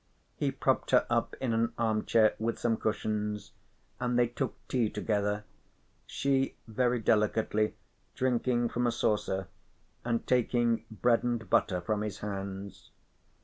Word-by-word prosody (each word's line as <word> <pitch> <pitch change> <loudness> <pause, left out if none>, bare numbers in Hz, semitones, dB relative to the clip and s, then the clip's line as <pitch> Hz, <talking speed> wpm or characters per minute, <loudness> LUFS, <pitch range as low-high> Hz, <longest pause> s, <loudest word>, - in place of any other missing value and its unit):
He - - 0
propped - - 0
her - - +5
up - - +1
in 125 -4 0
an 115 +1 +1
armchair 110 -1 +3
with 115 +1 -1
some 115 -1 +1
cushions, 105 -1 -2 0.5
and 125 -1 0
they 120 - +5
took 120 +3 -3
tea 120 -4 +1
together, 105 -1 -1 0.6
she 135 -1 0
very 125 +2 +1
delicately 110 0 +1 0.4
drinking 120 -1 +1
from 120 0 0
a - - +2
saucer 95 -4 0 0.6
and 115 -1 -1
taking 120 -2 +2
bread 115 +1 +2
and 120 -3 -1
butter 90 0 +2
from 105 +4 -1
his 105 -2 -3
hands. 100 -1 -6
115 Hz, 135 wpm, -30 LUFS, 105-120 Hz, 0.6 s, her